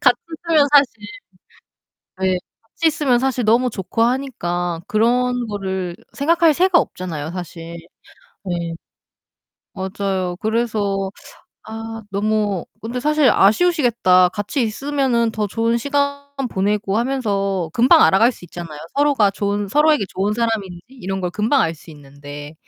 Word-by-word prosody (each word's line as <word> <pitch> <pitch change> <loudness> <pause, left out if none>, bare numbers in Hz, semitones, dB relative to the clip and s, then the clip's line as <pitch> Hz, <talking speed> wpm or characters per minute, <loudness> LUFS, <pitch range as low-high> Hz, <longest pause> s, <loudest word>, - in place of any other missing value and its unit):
같이 250 -2 +4 0.2
있으면 320 -4 +3
사실 285 -4 +6 1.3
네 185 -1 +1 0.2
같이 225 +9 -3
있으면 290 -6 +2
사실 260 -2 0
너무 235 +3 +3
좋고 215 +3 -2
하니까 175 -10 -1
그런 245 +3 +1
거를 190 -4 -4 0.2
생각할 330 +2 +3
새가 365 +2 +4
없잖아요, 160 -4 -5
사실. 170 -1 -7 0.7
예. 170 -1 -2 1.0
맞아요. 190 -2 -3
그래서 210 -4 -1 0.5
아 225 0 -7
너무 205 -2 0 0.2
근데 235 +3 -4
사실 300 -1 +3
아쉬우시겠다. 225 - +4
같이 205 +7 -2
있으면은 240 0 0
더 215 -1 -1
좋은 230 +3 0
시간 280 +2 -1 0.3
보내고 200 +1 0
하면서 200 -9 -1
금방 265 +8 +5
알아갈 225 +6 +5
수 200 - -13
있잖아요. 170 -3 -8 0.2
서로가 280 -8 +3
좋은 205 0 -2
서로에게 300 +1 +3
좋은 200 +2 -1
사람인지 210 -6 -2
이런 195 -7 -5
걸 180 -1 -2
금방 220 +8 +1
알 165 - -1
수 160 - -15
있는데 145 0 -11
215 Hz, 290 characters per minute, -20 LUFS, 190-255 Hz, 1.3 s, 사실